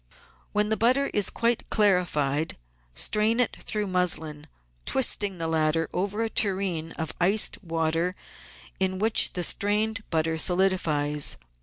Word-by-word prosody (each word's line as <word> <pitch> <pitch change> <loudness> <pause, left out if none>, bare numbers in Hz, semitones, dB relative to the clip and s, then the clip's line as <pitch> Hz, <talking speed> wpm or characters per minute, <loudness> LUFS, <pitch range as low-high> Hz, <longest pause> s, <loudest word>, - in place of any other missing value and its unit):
When 210 0 0
the 220 - 0
butter 255 +5 +2
is 205 -2 +2
quite 235 0 0
clarified 165 -8 +1 0.4
strain 215 - +1
it 250 - +1
through 210 -1 -1
muslin, 160 -5 -1 0.4
twisting 205 -7 +1
the 165 - -4
laFter 160 0 +1
over 200 +4 -2
a - - 0
tureen 185 -5 -1
of 160 -1 -4
iced 200 +4 +2
water 165 +1 -1 0.6
in 190 0 0
which 220 +3 +2
the 180 - -2
strained 215 +4 0
butter 160 0 0
solidifies. 160 -6 +2
185 Hz, 130 wpm, -26 LUFS, 160-210 Hz, 0.6 s, butter